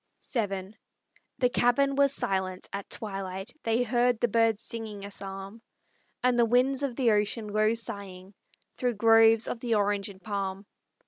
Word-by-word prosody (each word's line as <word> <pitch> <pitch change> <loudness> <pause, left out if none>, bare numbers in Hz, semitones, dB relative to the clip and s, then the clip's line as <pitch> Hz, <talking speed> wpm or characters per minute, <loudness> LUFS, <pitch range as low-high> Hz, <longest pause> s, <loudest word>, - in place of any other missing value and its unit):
VII 200 -4 -2 0.6
The 250 -2 +2
cabin 245 +3 +2
was 280 -1 +4
silent: 190 -8 -2
at 200 0 -5
twilight 195 0 -5
They 230 +2 +1
heard 245 0 +1
the 240 - +2
birds 225 0 +2
singing 215 -3 -6
a 200 - -8
psalm, 195 +2 -8 0.6
And 250 -1 +3
the 235 - +6
wind 255 +4 +2
of 275 -4 -2
the 240 -3 +3
ocean 210 +1 0
low 215 +2 +2
sighing 200 -4 -7 0.4
Through 245 -2 0
groves 225 +1 +5
of 230 - -4
the 230 -1 0
orange 205 0 0
and 190 -1 -12
palm. 195 0 -4
220 Hz, 155 wpm, -28 LUFS, 200-240 Hz, 0.6 s, the